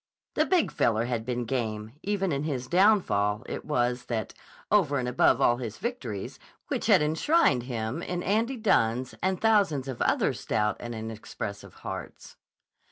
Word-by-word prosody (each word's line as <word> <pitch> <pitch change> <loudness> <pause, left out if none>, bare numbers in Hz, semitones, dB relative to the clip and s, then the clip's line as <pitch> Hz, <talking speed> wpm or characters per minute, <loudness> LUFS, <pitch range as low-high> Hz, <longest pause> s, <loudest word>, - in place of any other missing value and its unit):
The - - +2
Big 365 -3 +2
Feller 115 0 +1
had 120 -2 -3
been 125 -1 -1
game, 110 -3 -3
even 195 -2 -1
in 140 0 -1
his 135 -5 -2
downfall; 150 - +3
it - - -5
was 125 -4 0
that, 110 -4 -3 0.4
over 170 -9 +3
and 125 -2 -1
above 125 - +3
all 120 - +4
his 115 -4 -6
victories, 130 - -5 0.3
which - - -1
had - - +6
enshrined 160 - +3
him 115 +5 -3
in 180 0 -3
Andy 225 +7 +1
Dunne's 130 - +1
and 190 -1 0
thousands 200 -12 +2
of 130 -3 -5
other - - +2
stout 105 0 -1
and 120 -1 -6
inexpressive 110 -2 -7
hearts. - - -7
125 Hz, 160 wpm, -28 LUFS, 115-190 Hz, 0.4 s, had